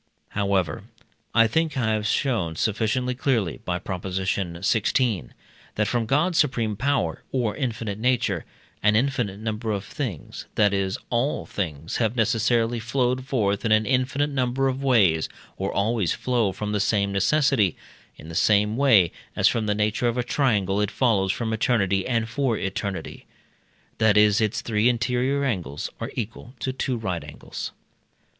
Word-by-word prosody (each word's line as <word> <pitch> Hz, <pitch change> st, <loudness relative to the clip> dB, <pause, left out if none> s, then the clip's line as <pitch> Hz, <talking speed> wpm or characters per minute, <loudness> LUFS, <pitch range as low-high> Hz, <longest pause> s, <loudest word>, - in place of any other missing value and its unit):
However, 100 Hz, -4 st, -1 dB, 0.5 s
I 115 Hz, -1 st, +7 dB
think 160 Hz, +6 st, 0 dB
I 110 Hz, -4 st, +1 dB
have 110 Hz, 0 st, 0 dB
shown 110 Hz, -, 0 dB
sufficiently 115 Hz, +7 st, 0 dB
clearly 120 Hz, -, 0 dB
(by 90 Hz, -1 st, -1 dB
Prop. 90 Hz, +1 st, -5 dB
xvi.), 95 Hz, -, 0 dB, 0.5 s
that 105 Hz, -1 st, +1 dB
from 120 Hz, -2 st, 0 dB
God's 160 Hz, +7 st, +2 dB
supreme 115 Hz, -7 st, +1 dB
power, 125 Hz, -, 0 dB
or 120 Hz, -5 st, 0 dB
infinite 115 Hz, -6 st, -3 dB
nature, 125 Hz, +1 st, +1 dB, 0.4 s
an 105 Hz, 0 st, +4 dB
infinite 120 Hz, -5 st, 0 dB
number 110 Hz, +1 st, -3 dB
of 100 Hz, -1 st, -3 dB
things 125 Hz, -, -6 dB
that 105 Hz, -1 st, +3 dB
is, 95 Hz, -1 st, 0 dB
all 125 Hz, +4 st, 0 dB
things 80 Hz, -5 st, -4 dB
have 115 Hz, 0 st, 0 dB
necessarily 115 Hz, 0 st, +2 dB
flowed 125 Hz, +2 st, -1 dB
forth 105 Hz, -8 st, 0 dB
in 115 Hz, -, 0 dB
an 110 Hz, 0 st, +4 dB
infinite 130 Hz, +3 st, +1 dB
number 130 Hz, 0 st, 0 dB
of 130 Hz, 0 st, -2 dB
ways, 100 Hz, -12 st, +3 dB, 0.3 s
or 95 Hz, +1 st, -2 dB
always 100 Hz, -3 st, +1 dB
flow 120 Hz, -6 st, 0 dB
from 105 Hz, +2 st, -4 dB
the 105 Hz, -, 0 dB
same 100 Hz, 0 st, +1 dB
necessity; 110 Hz, -, +2 dB, 0.4 s
in 75 Hz, -, -11 dB
the 85 Hz, -, -8 dB
same 105 Hz, +5 st, +3 dB
way 115 Hz, -, +5 dB, 0.2 s
as -, -, +4 dB
from 110 Hz, -2 st, +1 dB
the 105 Hz, -, +1 dB
nature 105 Hz, +3 st, +1 dB
of 120 Hz, +1 st, 0 dB
a 125 Hz, -, +1 dB
triangle 105 Hz, -7 st, +1 dB
it 105 Hz, -, +1 dB
follows 105 Hz, -7 st, +2 dB
from 110 Hz, +1 st, -2 dB
eternity 100 Hz, -4 st, +1 dB
and 115 Hz, -3 st, 0 dB
for 120 Hz, -1 st, 0 dB
eternity, 95 Hz, 0 st, -4 dB, 0.7 s
that 110 Hz, -2 st, +4 dB
its 105 Hz, 0 st, +3 dB
three 110 Hz, +1 st, +2 dB
interior 125 Hz, +3 st, 0 dB
angles 85 Hz, -, -3 dB
are -, -, -4 dB
equal 120 Hz, +3 st, -6 dB
to 130 Hz, -, -2 dB
two 130 Hz, -1 st, -2 dB
right 90 Hz, -8 st, -3 dB
angles. 75 Hz, 0 st, -7 dB
110 Hz, 155 wpm, -24 LUFS, 100-125 Hz, 0.7 s, I